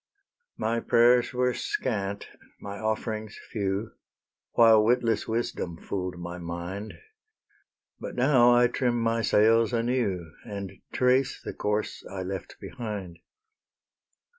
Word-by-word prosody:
My 115 +1 0
prayers 120 +1 +4
were 125 0 +1
scant, 100 -7 -2 0.3
my 100 0 -7
offerings 110 0 -3
few, 100 0 -2 0.6
While 115 -2 +6
witless 115 0 +2
wisdom 110 -7 -2
fool'd 90 0 -4
my 85 0 -6
mind; 85 +5 -6 1.0
But - - -6
now 125 -1 +5
I 120 0 +6
trim 120 0 0
my 115 0 +1
sails 115 +2 +4
anew, 115 -9 -1
And 100 -2 -6 0.2
trace 130 +1 +2
the - - -7
course 105 +1 -2
I 95 -1 -5
left 95 -1 -6
behind. 105 -8 -6
110 Hz, 115 wpm, -27 LUFS, 95-120 Hz, 1.0 s, While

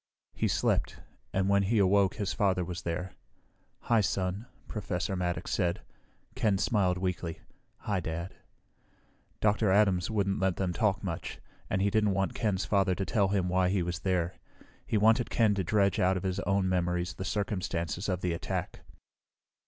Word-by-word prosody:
He - - 0
slept, - - 0 0.3
and 95 0 +1
when 100 0 +4
he 105 +4 +1
awoke 100 -1 +3
his 105 -3 -2
father 95 -4 +1
was 85 0 -5
there. 90 +2 -3 0.7
"Hi, 115 -2 +3
Son," 95 +3 -2 0.2
Professor 90 -2 -3
Maddox 90 -1 -2
said. 85 0 0 0.5
Ken 110 -6 +1
smiled 95 -4 +1
weakly. 90 -3 -3 0.4
"Hi, 100 -3 -1
Dad." 85 +1 -4 1.1
Dr. 105 0 +3
Adams 95 -3 +3
wouldn't 100 -2 0
let 95 -2 +1
them 90 -2 -1
talk 100 0 +1
much, 85 -4 -4 0.3
and 95 - +1
he 100 - +2
didn't 105 -3 +2
want 95 +4 0
Ken's 105 -6 -1
father 95 -2 +2
to 95 - -2
tell 100 -1 +2
him 95 -2 0
why 90 0 +2
he 95 -2 +1
was 85 -1 -3
there. 90 +1 -1 0.5
He 110 - +1
wanted 115 +3 +4
Ken 110 -3 +3
to 100 -1 -1
dredge 100 +1 +2
out 95 +1 +3
of 90 - -5
his 95 0 -1
own 100 -1 +1
memories 90 -1 0
the 95 - -6
circumstances 95 -3 -2
of 90 -1 -1
the 90 -2 0
attack. 85 - -4
95 Hz, 170 wpm, -30 LUFS, 90-100 Hz, 1.1 s, when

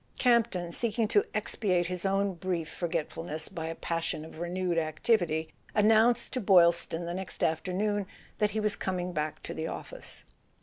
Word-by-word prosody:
Camp 235 -3 +4
ton, 175 -2 -4
seeking 225 +3 0
to 210 -2 +5
ex¬ 215 +1 -1
piate 180 -5 +2
his 180 +2 -1
own 195 0 +1
brief 175 -2 -2
forgetfulness 165 -1 -3
by 165 -4 -5
a 165 - -4
passion 165 -2 -2
of 160 - -11
re¬ 170 +1 -3
newed 180 -1 0
activity, 160 0 +1 0.3
announced 225 +3 +4
to 255 - -1
Boylston 170 -3 +4
the 170 - -3
next 190 0 -5
after¬ 160 +3 0
noon 205 0 0 0.3
that 210 -1 +3
he 215 +1 -2
was 210 -1 +2
coming 180 -2 -2
back 155 -1 -3
to - - -5
the 160 0 -3
office. - - -7
180 Hz, 180 wpm, -30 LUFS, 165-210 Hz, 0.3 s, to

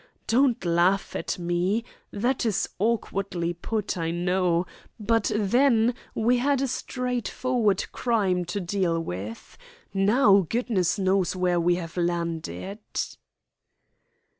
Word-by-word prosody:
Don't 245 -4 +2
laugh 175 +3 +2
at - - -2
me. 175 +5 0 0.3
That 240 +5 0
is 220 -5 0
awkwardly 195 -5 -1
put, 205 +2 -3
I 165 0 -1
know. 175 0 +1 0.3
But 225 0 +1
then 235 +3 +3 0.2
we 240 +2 +2
had 280 +2 +2
a - - +1
straightforward 250 -4 -1
crime 200 -7 +1
to 175 +4 -3
deal 180 -2 0
with. 105 - -7 0.3
Now, 200 -1 +4
goodness 220 -7 0
knows 190 -1 +1
where 180 -1 +1
we 175 +1 +3
have 170 -1 -6
landed." 170 - -2
195 Hz, 115 wpm, -26 LUFS, 175-230 Hz, 0.3 s, Now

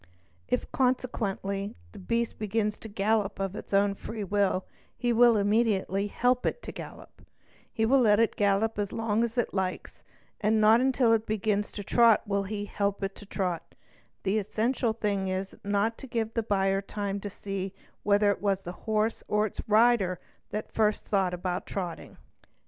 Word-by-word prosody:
If, - - -1
consequently, 215 -5 -1
_ - - -25
the 205 - -11
beast 230 +4 -1
begins 210 0 -1
to - - -8
gallop 205 -1 0
of 195 0 -2
its - - -8
own 200 0 +3
free 215 +2 -6
will, 200 -1 +1 0.3
he 240 0 +1
will 235 -1 +6
immediately 205 -2 +1
help 245 +4 +1
it - - -1
i - - -16
to - - -5
gallop; - - -11 0.5
he 225 -1 0
will 270 +4 +4
let 210 -4 +5
it 230 - +2
gallop 205 +2 +1
as 205 -1 -1
long 225 0 0
as 235 +1 -3
it 240 - 0
likes, 190 -1 -3 0.4
and 215 +1 +2
not 220 +2 +6
till 240 -4 +4
it 225 0 +1
begins 210 -1 0
to 205 - -5
trot 230 +2 +5
will 200 -1 0
he 205 +1 -4
help 200 -1 -2
it 195 0 -2
to 205 - -12
trot; 175 -4 -3 0.5
the 200 +2 +1
essential 225 +3 0
thing 205 -3 -1
is 190 +1 -3
not 205 +3 0
to 270 - -9
give 225 -2 -2
the 230 - +1
buyer 195 -2 +1
time 200 0 -3
to 205 - -5
see 195 -1 -5 0.3
whether 205 0 +3
it - - -4
was 195 -2 +1
the 175 - -6 0.2
horse 215 +1 +1
or 210 0 +2
its 210 - -5
rider 215 -4 +4 0.3
that 210 +1 -5
first 215 -1 +1
thought 195 -3 +1
about 180 0 -3
trotting. 180 -4 -5
205 Hz, 185 wpm, -28 LUFS, 195-225 Hz, 0.5 s, will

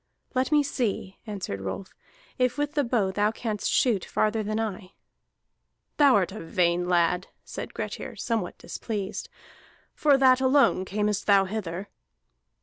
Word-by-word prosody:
"Let 260 +3 0
me 295 -1 +5
see," 225 -8 -2
answered 190 - -4
Rolf, 95 - -5 0.5
"if 250 +1 +2
with 290 0 -1
the 290 - +2
bow 230 -6 +1
thou 205 +2 +2
canst 220 -2 -3
shoot 225 -8 +2
farther 215 +1 0
than 215 +1 -2
I." 205 -3 -4 1.0
"Thou 285 -3 +6
art 190 -3 +2
a 215 - -7
vain 175 +1 +1
lad," 180 +1 +2 0.2
said - - -7
Grettir, - - -5
somewhat 225 -6 -2
displeased. 205 -4 -5 0.6
"For 290 -3 +4
that 260 -1 +5
alone 260 -8 +4
earnest 210 0 0
thou 200 -1 +5
hither?" 190 -2 -4
210 Hz, 145 wpm, -26 LUFS, 190-250 Hz, 1.0 s, Thou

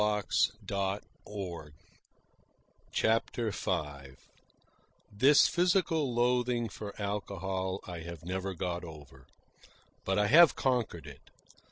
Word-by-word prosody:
CHAPTER 115 0 +1
V 70 -6 -3 1.0
This 135 +8 +6
physical 170 -5 +2
loathing 120 -1 +1
for 105 0 -8
alcohol 95 -2 -3
I 90 -2 -6
have 85 -1 -9
never 95 +1 -3
got 90 0 -3
over. 75 -5 -12 0.8
But 95 - 0
I 105 - +3
have 165 +8 +7
conquered 120 -10 -1
it. 70 -3 -13
100 Hz, 85 wpm, -31 LUFS, 85-120 Hz, 1.0 s, have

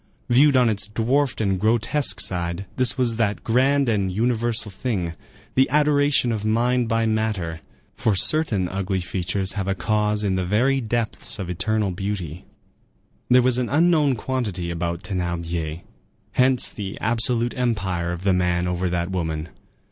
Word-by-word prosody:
Viewed 135 +3 +5
on 125 -1 +4
its 105 -3 +1
dwarfed 125 +4 0
and 95 -3 0
grotesque 115 +1 +1
side, 85 +1 -2
this 130 -1 +2
was 120 -3 +1
that 105 -3 0
grand 135 +4 +2
and 100 -5 0
universal 115 0 0
thing, 95 -5 -3 0.4
the 130 +1 +3
adoration 145 -3 +3
of 110 -2 -3
mind 120 +2 +1
by 115 -1 +1
matter; 105 -7 -1 0.3
for 110 - +1
certain 105 - +2
ugly 95 +1 -2
features 95 +2 -2
have 100 -2 -3
a 95 - 0
cause 105 +1 0
in 100 -2 +1
the 95 0 0
very 125 +9 +1
depths 115 -1 -1
of 90 -3 -4
eternal 100 +3 0
beauty. 90 -3 -5 0.8
There 125 0 +6
was 125 0 +2
an 125 - -1
unknown 155 -3 +3
quantity 105 -9 -3
about 85 +2 -3
Thénardier; 85 -4 -3 0.5
hence 130 -1 +2
the 100 -2 -6
absolute 120 +1 +1
empire 95 -8 -1
of 85 +1 -6
the 95 -1 +3
man 90 -1 +1
over 90 +1 -1
that 85 +1 -2
woman. 80 -3 -3
105 Hz, 155 wpm, -23 LUFS, 90-120 Hz, 0.8 s, There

